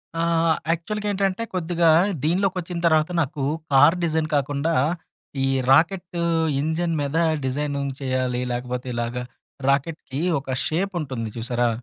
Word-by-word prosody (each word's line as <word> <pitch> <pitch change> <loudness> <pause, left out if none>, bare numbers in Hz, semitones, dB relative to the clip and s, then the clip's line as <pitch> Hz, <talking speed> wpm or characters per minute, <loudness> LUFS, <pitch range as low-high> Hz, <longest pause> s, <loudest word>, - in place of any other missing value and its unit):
ఆ! 165 - -1 0.5
యాక్చువల్‌గేంటంటే 200 +3 -1
కొద్దిగా 170 -1 +2 0.3
దీనిలోకోచ్చిన 180 +1 0
తర్వాత, 155 0 +3
నాకు 140 -1 -3 0.3
కార్ 145 +6 +6
డిజైన్ 160 -1 0
కాకుండా 145 +3 0 0.7
ఈ - - +1 0.2
రాకెట్టు 170 +3 +2 0.4
ఇంజిన్ 165 +3 -1
మీద 145 +3 -1 0.3
డిజైనింగ్ 140 +1 -2
చేయాలి 130 -2 -1
లేకపోతే 125 +1 -4
ఇలాగా 120 +1 -2 0.5
రాకెట్‌కి 140 0 -1 0.2
ఒక 135 0 -12 0.2
షేపుంటుంది 155 - -2
చూసారా? 120 +1 0
155 Hz, 105 wpm, -23 LUFS, 135-170 Hz, 0.7 s, కార్